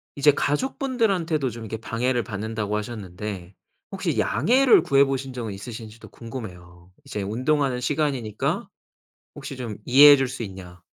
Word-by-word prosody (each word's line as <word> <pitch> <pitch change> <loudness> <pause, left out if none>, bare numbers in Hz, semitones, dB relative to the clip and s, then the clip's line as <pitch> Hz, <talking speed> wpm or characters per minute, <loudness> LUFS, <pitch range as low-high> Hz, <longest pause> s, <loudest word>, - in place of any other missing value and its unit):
이제 145 +1 +5
가족분들한테도 180 - 0
좀 115 0 -8
이렇게 110 +1 -5
방해를 120 +2 -1
받는다고 105 +1 -3
하셨는데 100 -3 -6 0.4
혹시 - - -2
양해를 245 - +4
구해 140 0 +4
보신 135 -1 -2
적은 115 -4 -5
있으신지도 110 +2 -9
궁금해요. 90 -7 -10
이제 105 - -5
"운동하는 130 +5 0
시간이니까 130 -6 -1 0.7
혹시 135 - -8
좀 120 -5 -5
이해해 145 +3 +8
줄 135 -1 0
수 125 -1 -6
있냐?" 90 -4 -9
120 Hz, 355 characters per minute, -24 LUFS, 105-140 Hz, 0.7 s, 이해해